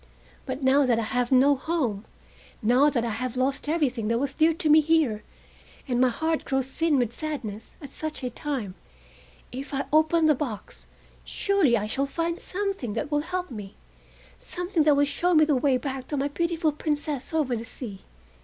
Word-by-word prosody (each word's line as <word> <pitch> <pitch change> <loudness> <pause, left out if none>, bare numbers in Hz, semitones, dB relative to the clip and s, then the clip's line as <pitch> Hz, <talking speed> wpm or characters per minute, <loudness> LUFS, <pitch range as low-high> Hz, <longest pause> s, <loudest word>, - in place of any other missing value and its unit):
But 265 +1 -4
now 270 +2 +5
that 240 -2 +3
I 230 - 0
have 245 +2 -1
no 270 +2 +5
home, 260 -9 -2 0.6
now 250 +6 +5
that 240 -5 -1
I 230 - -2
have 250 +3 -4
lost 270 +3 -1
everything 265 -9 0
that 230 +1 +1
was 275 +2 -1
dear 320 +2 +4
to 325 0 -2
me 305 +1 +7
here, 300 -9 +2 0.7
and 245 -1 +1
my 255 - +5
heart 320 +6 -1
grows 265 -1 -1
thin 325 -1 +1
with 240 -2 0
sadness, 245 -8 -6
at 280 - -7
such 310 -2 -6
a 250 - -2
time, 245 -8 -4 0.8
if 275 +3 -6
I 275 - -1
open 315 +1 +4
the 310 - +6
box, 250 -7 -6 0.4
surely 380 - +2
I 210 - -2
shall 270 +6 -1
find 335 +4 -2
something 390 - -3
that 235 +7 -3
will 295 0 +2
help 360 0 -4
me, 205 -4 -8 0.6
something 355 -1 -2
that 300 -2 +5
will 285 +1 +4
show 350 +5 0
me 310 0 +6
the 300 -2 +2
way 260 0 +2
back 265 -1 -5
to 290 - -3
my 280 +1 0
beautiful 335 +1 0
Princess 295 -2 -3
over 300 -6 0
the 225 - -4
sea. 225 -4 -8
280 Hz, 190 wpm, -26 LUFS, 245-315 Hz, 0.8 s, me